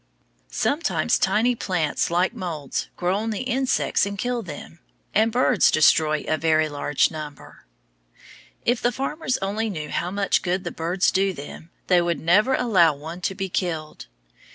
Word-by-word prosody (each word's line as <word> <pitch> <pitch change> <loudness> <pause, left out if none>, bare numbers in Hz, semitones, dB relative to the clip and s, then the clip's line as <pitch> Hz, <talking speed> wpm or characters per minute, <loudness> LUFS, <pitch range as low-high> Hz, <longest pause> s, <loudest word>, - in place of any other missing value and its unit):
Sometimes 300 +5 0
tiny 240 +3 +2
plants, 180 -9 -1
like 175 +2 +1
moulds, 155 -6 -4
grow 180 +2 0
on 220 +2 -2
the 220 +3 -3
insects 260 +1 +1
and 200 +1 -2
kill 245 +3 -2
them; 165 -2 -9 0.3
and 220 +2 +3
birds 245 -4 +3
destroy 155 0 +3
a 155 - 0
very 155 -1 +2
large 145 -1 0
number. 150 - -10 1.0
If 240 0 +1
the 245 - +2
farmers 270 +2 -2
only 215 +3 -1
knew 155 -6 -5
how 175 - -2
much 200 +1 +1
good 185 +1 -1
the 175 - -4
birds 175 +3 0
do 195 0 +1
them, 150 +2 -10 0.2
they 180 -2 +4
would 170 -1 -1
never 210 +11 +3
allow 185 -11 +3
one 160 +5 -8
to 190 +2 -2
be 195 0 -3
killed. 160 - -4
185 Hz, 160 wpm, -23 LUFS, 160-220 Hz, 1.0 s, they